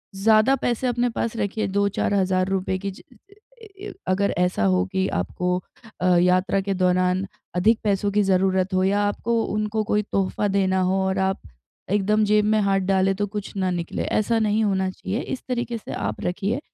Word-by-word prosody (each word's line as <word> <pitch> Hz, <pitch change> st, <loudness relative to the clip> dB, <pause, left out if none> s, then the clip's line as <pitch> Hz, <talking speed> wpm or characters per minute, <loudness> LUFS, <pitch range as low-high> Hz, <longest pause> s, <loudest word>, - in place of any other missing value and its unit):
ज़्यादा 215 Hz, +6 st, +4 dB
पैसे 245 Hz, -1 st, -1 dB
अपने 245 Hz, 0 st, +1 dB
पास 230 Hz, 0 st, -2 dB
रखिए 205 Hz, +2 st, -1 dB
2-4 200 Hz, +1 st, 0 dB
हज़ार 185 Hz, -1 st, +1 dB
रुपये 190 Hz, 0 st, -1 dB
की 195 Hz, +1 st, -4 dB
ज 185 Hz, -, -14 dB
अ 440 Hz, +4 st, -24 dB
अ, -, -, -10 dB, 0.2 s
य 415 Hz, -, -6 dB
अगर 200 Hz, +2 st, +1 dB
ऐसा 180 Hz, -, +1 dB
हो 90 Hz, -1 st, +2 dB
कि 190 Hz, 0 st, 0 dB
आपको 180 Hz, -, -1 dB, 0.4 s
अ, -, -, 0 dB
यात्रा 180 Hz, +2 st, +2 dB
के 195 Hz, 0 st, -2 dB
दौरान 185 Hz, 0 st, +1 dB, 0.3 s
अधिक 215 Hz, +6 st, +3 dB
पैसों 200 Hz, -1 st, +1 dB
की 210 Hz, +1 st, +2 dB
ज़रूरत 190 Hz, 0 st, +1 dB
हो 185 Hz, 0 st, +2 dB
या 200 Hz, +2 st, +2 dB
आपको 230 Hz, +3 st, -1 dB
उनको 215 Hz, +1 st, -1 dB
कोई 210 Hz, 0 st, +1 dB
तोहफ़ा 195 Hz, +1 st, 0 dB
देना 190 Hz, -1 st, +1 dB
हो 185 Hz, +1 st, +1 dB
और 190 Hz, 0 st, -1 dB
आप 190 Hz, 0 st, 0 dB, 0.5 s
एकदम 210 Hz, +2 st, +2 dB
जेब 210 Hz, 0 st, +3 dB
में 215 Hz, 0 st, +3 dB
हाथ 195 Hz, -1 st, +2 dB
डाले 190 Hz, 0 st, +3 dB
तो 205 Hz, +1 st, -1 dB
कुछ 205 Hz, 0 st, -6 dB
ना 185 Hz, -1 st, 0 dB
निकले। 170 Hz, -2 st, -3 dB
ऐसा 225 Hz, +2 st, 0 dB
नहीं 215 Hz, 0 st, +1 dB
होना 190 Hz, -2 st, +1 dB
चाहिए, 195 Hz, +5 st, -4 dB
इस 260 Hz, -, -5 dB
तरीके 240 Hz, -1 st, -2 dB
से 220 Hz, -, -8 dB
आप 105 Hz, +1 st, -3 dB
रखिए। 205 Hz, +7 st, -1 dB
195 Hz, 195 wpm, -23 LUFS, 185-215 Hz, 0.5 s, ज़्यादा